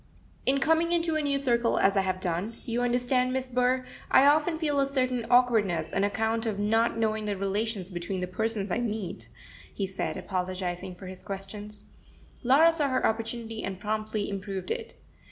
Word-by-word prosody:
"In 275 Hz, +1 st, +4 dB
coming 325 Hz, +4 st, +2 dB
into 335 Hz, -2 st, +1 dB
a 310 Hz, -, +1 dB
new 285 Hz, -1 st, +1 dB
circle 240 Hz, -4 st, +2 dB
as 195 Hz, +1 st, +3 dB
I 195 Hz, -, +4 dB
have 185 Hz, -1 st, -1 dB
done, 185 Hz, +5 st, -2 dB
you 235 Hz, +1 st, -1 dB
understand, 245 Hz, +1 st, +2 dB
Miss 260 Hz, 0 st, -2 dB
Burr, 250 Hz, +1 st, +1 dB, 0.2 s
I 270 Hz, -, +6 dB
often 305 Hz, +3 st, +4 dB
feel 295 Hz, -3 st, 0 dB
a 275 Hz, -, +4 dB
certain 255 Hz, -4 st, 0 dB
awkwardness 210 Hz, -10 st, +3 dB
on 195 Hz, -, +1 dB
account 225 Hz, +3 st, 0 dB
of 210 Hz, -3 st, -1 dB
not 225 Hz, +3 st, +2 dB
knowing 220 Hz, -1 st, 0 dB
the 205 Hz, -2 st, -2 dB
relations 195 Hz, 0 st, -2 dB
between 175 Hz, +2 st, -4 dB
the 180 Hz, -, -1 dB
persons 205 Hz, +1 st, -2 dB
I 225 Hz, -, +1 dB
meet," 220 Hz, -5 st, -4 dB, 0.4 s
he 200 Hz, -, -2 dB
said, 190 Hz, 0 st, -3 dB
apologizing 185 Hz, -1 st, -3 dB
for 185 Hz, -, -11 dB
his 185 Hz, 0 st, -8 dB
questions. 205 Hz, +1 st, -7 dB, 0.6 s
Laura 280 Hz, +7 st, +6 dB
saw 300 Hz, -4 st, 0 dB
her 255 Hz, 0 st, +1 dB
opportunity, 225 Hz, 0 st, -2 dB
and 190 Hz, -1 st, -4 dB
promptly 215 Hz, 0 st, -2 dB
improved 195 Hz, -, -4 dB
it. 460 Hz, 0 st, -4 dB
225 Hz, 180 wpm, -28 LUFS, 195-255 Hz, 0.6 s, I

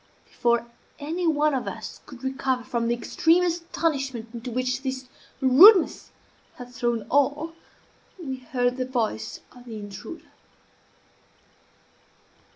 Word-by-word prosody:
Before 235 Hz, 0 st, 0 dB, 0.3 s
any 330 Hz, +4 st, -2 dB
one 305 Hz, -1 st, +2 dB
of 260 Hz, -, -2 dB
us -, -, -7 dB
could 260 Hz, -3 st, -12 dB
recover 265 Hz, -1 st, -1 dB
from 235 Hz, -1 st, -2 dB
the 235 Hz, -, +1 dB
extreme 330 Hz, +8 st, +2 dB
astonishment 310 Hz, -8 st, -2 dB
into 240 Hz, +1 st, -6 dB
which 255 Hz, +2 st, -1 dB
this 260 Hz, -1 st, -4 dB, 0.3 s
rudeness 330 Hz, -, +7 dB, 0.5 s
had 245 Hz, 0 st, -11 dB
thrown 240 Hz, -2 st, -1 dB
all, 290 Hz, +4 st, +1 dB, 0.7 s
we 270 Hz, -6 st, -5 dB
heard 245 Hz, 0 st, -1 dB
the 255 Hz, -, -1 dB
voice 225 Hz, -, -2 dB
of 245 Hz, -1 st, -16 dB
the 230 Hz, -2 st, -8 dB
intruder. 205 Hz, -, -9 dB
260 Hz, 120 wpm, -25 LUFS, 240-300 Hz, 0.7 s, rudeness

